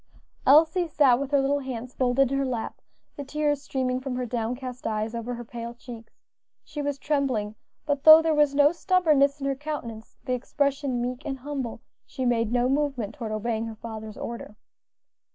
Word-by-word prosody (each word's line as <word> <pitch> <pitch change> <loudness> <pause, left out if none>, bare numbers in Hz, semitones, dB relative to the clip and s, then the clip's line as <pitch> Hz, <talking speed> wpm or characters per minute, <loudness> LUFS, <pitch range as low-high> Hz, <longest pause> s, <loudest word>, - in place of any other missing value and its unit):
Elsie 325 +5 +5
sat 280 -5 +4
with 280 -1 -3
her 285 -1 +3
little 275 +1 +1
hands 255 -2 -6
folded 260 +1 +2
in 275 - +1
her - - +1
lap, 245 -4 -4 0.4
the 285 - -4
tears 295 0 -1
streaming 255 -2 -1
from 260 -1 -4
her 250 0 -2
downcast 245 +2 -4
eyes 215 +1 -2
over 235 +1 -4
her 240 0 -8
pale 235 +1 -7
cheeks. 235 -2 -11 0.5
She 295 - -6
was 285 -1 -2
trembling, 270 -8 -1 0.3
but 285 -1 -1
though 315 0 +11
there 325 -1 +1
was 295 -2 +3
no 290 +1 +6
stubbornness 310 -6 +2
in 275 - -4
her 275 - +1
countenance, 265 -6 -7
the 255 - -1
expression 270 0 -1
meek 250 +3 -4
and 270 - -4
humble, 260 -4 -5 0.2
she 260 -2 -5
made 230 -2 +1
no 245 0 +2
movement 270 -6 -1
toward 230 -6 -6
obeying 220 +1 -2
her 225 - -7
father's 220 -1 -8
order. 230 -3 -7
260 Hz, 185 wpm, -26 LUFS, 235-285 Hz, 0.5 s, though